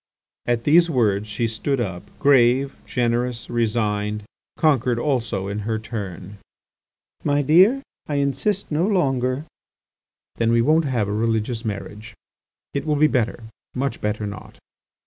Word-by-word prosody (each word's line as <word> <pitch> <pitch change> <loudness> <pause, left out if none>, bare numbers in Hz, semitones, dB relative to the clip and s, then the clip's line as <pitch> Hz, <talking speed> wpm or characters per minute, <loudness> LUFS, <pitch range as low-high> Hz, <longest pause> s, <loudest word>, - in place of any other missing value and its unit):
At 120 -1 +1
these 170 +5 +5
words 105 -7 +1
she 105 +3 -2
stood 120 +5 -2
up 95 -6 -3 0.2
grave, 135 0 +4
generous, 120 0 -1
resigned, 105 -2 0 0.3
conquered 130 -6 +2
also 120 -7 -1
in 100 +1 -3
her 110 +1 -2
turn. 100 -3 -7 0.8
"My 145 0 +2
dear, 190 - +5 0.2
I 150 - -2
insist 145 +9 0
no 160 +5 +1
longer." 135 - 0 0.9
"Then 115 0 +2
we 115 - +4
won't 155 +4 +3
have 120 -7 0
a 100 - -2
religious 115 +1 -1
marriage. 105 +1 -6 0.6
It 140 - -1
will 150 - +2
be 150 +1 +4
better, 120 -5 0 0.3
much 135 +2 -2
better 105 0 -1
not." 100 0 -8
120 Hz, 135 wpm, -22 LUFS, 105-140 Hz, 0.9 s, these